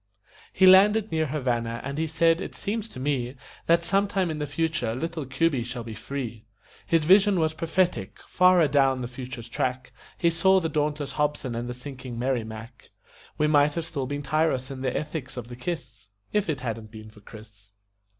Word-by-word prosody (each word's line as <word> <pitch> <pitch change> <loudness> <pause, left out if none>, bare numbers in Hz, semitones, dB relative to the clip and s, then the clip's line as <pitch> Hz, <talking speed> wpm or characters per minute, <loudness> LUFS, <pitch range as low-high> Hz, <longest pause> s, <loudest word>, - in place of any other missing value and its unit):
He 190 - +4
landed 205 +3 +6
near 160 -1 +1
Havana, 120 -5 -1
and 140 +3 -4
he 160 - 0
said: 165 +2 +2
"It - - -6
seems 220 +2 -3
to 130 - -10
me 130 -2 -1 0.3
That 170 0 +4
sometime 195 -1 +1
in 155 - -4
the 150 - -2
future 145 -6 -1
little 160 +1 -4
Cuby 135 +1 +1
shall 125 0 -5
be 115 -1 -7
free." 115 -2 -6 0.4
His 165 -2 +2
vision 195 +2 +5
was 160 -1 +1
prophetic 170 +3 -1
far 180 0 +4
adown 135 -3 +3
the 120 - -3
future's 125 -1 -8
track 130 +2 -3 0.2
He 170 - +2
saw 190 +3 +4
the 165 -3 -2
dauntless 150 -1 -1
Hobson 150 -4 -1
and 120 +1 -4
the 125 - -5
sinking 125 -2 -8
Merrimac. 115 -2 -4 0.5
We 150 - +2
might 150 -1 +4
have 170 -1 -2
still 140 -6 -4
been 145 +1 -4
tyros 140 -2 0
in 130 -1 -7
the 130 -1 -1
ethics 150 -4 -5
of 120 -1 -6
the 120 - -7
kiss 125 - -6 0.2
If 210 -4 +1
it 145 -5 -2
hadn't 115 -3 -4
been 110 0 -11
for 110 - -17
Chris. 105 -1 -14
140 Hz, 190 wpm, -26 LUFS, 125-165 Hz, 0.5 s, landed